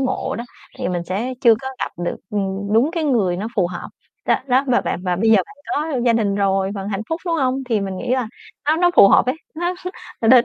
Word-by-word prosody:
ngộ 260 -1 -1
đó, 235 - -4 0.3
thì - - -2
mình 175 -1 -2
sẽ 215 +9 -3
chưa 230 -2 +6
có 265 +4 -6
gặp - - -3
được, - - -2
ừm, 200 0 -2
đúng 245 +8 +4
cái 330 -3 -1
người 210 -11 +2
nó 205 +4 -3
phù 185 - +3
hợp. 175 0 -7 0.4
Đó - - +4
đó, 260 +2 +3
và 250 -2 +3
bạn - - -3
và 180 -1 0
bây 220 +4 +2
giờ 220 - +7
bạn 195 +8 -2 0.2
có 295 -3 -1
gia 235 - +4
đình 210 -3 +1
rồi 195 -1 +1
vận 195 -1 -4
hạnh 200 -1 -2
phúc, 325 +2 -2
đúng 335 - +1
hông? 265 -2 0
Thì 220 -4 +1
mình 190 -1 -3
nghĩ 245 +5 -4
là 250 -4 -1 0.4
nó 310 +2 +3
nó 355 +1 +4
phù 195 - +9
hợp - - +5
ấy. 255 - +1 0.2
Nó 350 +3 -1 0.5
nó 225 - +3
đến 250 0 +7
225 Hz, 260 wpm, -20 LUFS, 195-265 Hz, 0.5 s, phù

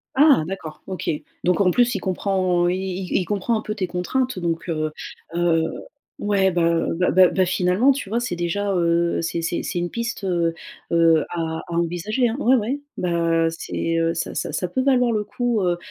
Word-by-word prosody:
Ah, 285 - +6
d'accord, 175 -4 -7
OK. 185 -3 -4 0.4
Donc 180 +1 +3
en 180 -2 +4
plus, 245 +2 +2
il - - -1
comprend 185 -2 +1
il 180 - +1 0.3
il - - -6
c - - -5
il - - -4
comprend 205 +5 0
un - - -3
peu 215 - -4
tes 190 -4 -2
contraintes. 225 +6 -1
Donc, 170 0 -2
heu 155 -2 -1 0.4
heu, 170 -2 +2 0.6
ouais. 195 -2 +2
Bah 170 -1 +2
bah 180 - +2
bah 185 0 +7
bah, 185 +2 +2
finalement, 185 +9 +3
tu 260 -8 -6
vois, 230 - 0
c'est 240 -7 -3
déjà, 195 +4 -1
heu, 170 -1 +1
c'est 165 0 -2
c'est 170 +1 -2
c'est 175 - -2
une 175 - -2
piste, 235 -2 -4
heu 170 -3 +1 0.4
heu, 165 -2 +4
à 160 -1 -3
à 170 - -8
envisager, 175 +9 0
hein. 230 - -2
Ouais, 260 -2 +4
ouais, 250 +6 -2 0.2
bah, 170 -2 +1
c'est, 165 0 -2
heu, 165 0 +1
ça 170 - -4
ça - - -2
ça 180 - -2
peut 260 +9 -1
valoir 250 -3 +3
le 210 -1 0
coup, 230 +1 -1
heu 175 -2 +1
180 Hz, 205 wpm, -22 LUFS, 170-215 Hz, 0.6 s, bah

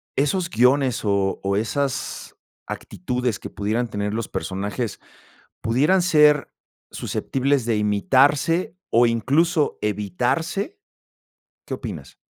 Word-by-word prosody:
esos 165 +5 0
guiones, 125 +1 +3
o 100 -2 +1
o, 100 0 0
esas 135 +5 -2 0.3
actitudes 120 +4 -3
que - - -7
pudieran 110 +4 -1
tener 105 -1 -3
los 115 0 -2
personajes 100 +6 -4 0.6
pudieran 150 +11 +3
ser 150 -4 +4 0.4
susceptibles 135 -2 -1
de 115 - +2
imitarse, 135 - +2
o, 120 +1 +5
incluso 145 - +1
evitarse? 130 - -1 0.9
¿Qué - - -3
opinas? - - -7
125 Hz, 100 wpm, -23 LUFS, 105-150 Hz, 0.9 s, o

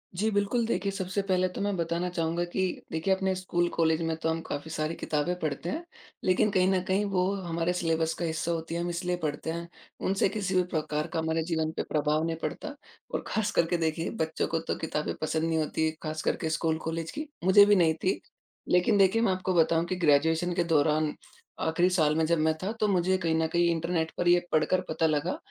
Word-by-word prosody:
जी, 210 +5 +1
बिल्कुल। 205 +4 +1
देखिए 200 -3 -1
सबसे 190 0 -2
पहले 185 -2 +1
तो - - -3
मैं 205 0 0
बताना 170 +1 -1
चाहूँगा 170 0 -1
कि - - 0 0.3
देखिए 160 +4 +1
अपने 190 0 0
स्कूल 175 -2 0
कॉलेज 160 0 +2
में 165 -1 -1
तो 160 - -1
हम 160 0 0
काफ़ी 155 0 -6
सारी 155 +1 -2
किताबें 150 +3 -1
पढ़ते 155 +2 -3
हैं। 325 - -3 0.4
लेकिन 185 +3 +3
कहीं 185 -1 +3
न 190 -1 +2
कहीं 190 +1 +1
वो 180 -2 +1 0.2
हमारे 170 0 -1
सिलेबस 165 -2 0
का 175 - -1
हिस्सा 160 +1 -1
होती 165 0 -3
है 170 - -1
हम 175 - -2
इसलिए 180 +1 -1
पढ़ते 150 +1 -2
हैं। 170 +1 -5 0.4
उनसे 195 0 +2
किसी 195 -2 -2
भी 185 - +4
प्रकार 150 -1 -1
का - - -3
हमारे 160 0 0
जीवन 160 -2 0
पे - - 0
प्रभाव 150 +1 +1
नहीं 165 0 -1
पड़ता 285 - -4 0.4
और - - -1
खास 215 -1 0
करके 170 +1 +2
देखिए 165 0 -1
बच्चों 160 0 -1
को 165 - -1
तो 165 - -3
किताबें 150 -1 -2
पसंद 160 0 0
नहीं 165 0 +1
होती 160 +1 0
खासकर 155 0 -1
के - - 0
स्कूल 160 0 0
कॉलेज 165 0 -3
की, 305 +1 -5 0.2
मुझे 190 +3 +7
भी 205 0 +5
नहीं 165 -4 +4
थीं। 185 - +1 0.5
लेकिन 180 +3 +4
देखिए 195 +3 +4
मैं 230 - +3
आपको 185 0 -2
बताऊँ 165 -1 +3
कि 185 - -2
ग्रैजूएशन 160 +1 +2
के 175 - +1
दौरान 155 -1 +2 0.5
आखिरी 175 +3 +2
साल 155 -5 +2
में 160 0 +2
जब 170 +1 +2
मैं 160 0 +3
था 195 - -1
तो 215 - +2
मुझे 185 -1 +2
कहीं 165 -3 0
न 160 0 +1
कहीं 170 0 +3
इंटरनेट 165 0 -1
पर 175 - 0
ये 175 0 +6
पढ़कर 155 +4 +2
पता 165 - +1
लगा 155 +3 0
170 Hz, 220 wpm, -28 LUFS, 160-185 Hz, 0.5 s, मुझे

